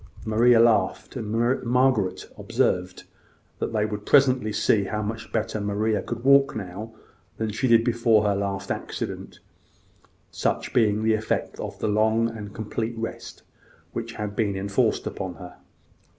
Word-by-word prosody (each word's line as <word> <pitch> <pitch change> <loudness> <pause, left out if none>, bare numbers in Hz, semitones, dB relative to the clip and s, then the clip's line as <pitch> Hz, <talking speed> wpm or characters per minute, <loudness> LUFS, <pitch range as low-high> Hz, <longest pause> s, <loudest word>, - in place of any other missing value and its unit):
Maria 115 +2 +4
laughed; 115 -2 +2
and 120 +2 0
Margaret 125 -5 +1
observed 90 0 -1 0.6
that - - -2
they 105 -2 +1
would 105 -1 -5
presently 130 -4 +4
see 105 -1 +2
how 105 +2 -3
much 110 +2 -5
better 110 -1 -2
Maria 105 +1 0
could 120 0 -6
walk 140 +1 +5
now 105 +2 -7 0.4
than 110 -1 -2
she 110 +5 -1
did 115 -1 +5
before 115 -2 +3
her 105 -1 +2
last 100 0 -3
accident, - - -5 0.9
such - - -2
being 110 -2 +2
the 110 0 +3
effect 110 0 -2
of - - -6
the - - -2
long 110 +2 +2
and 105 -2 -7
complete 110 +2 -4
rest 115 0 -6 0.5
which 115 0 -5
had 105 -2 -5
been 100 -3 0
enforced 100 +1 0
upon 95 -2 -5
her. 90 +1 -11
110 Hz, 150 wpm, -25 LUFS, 105-115 Hz, 0.9 s, walk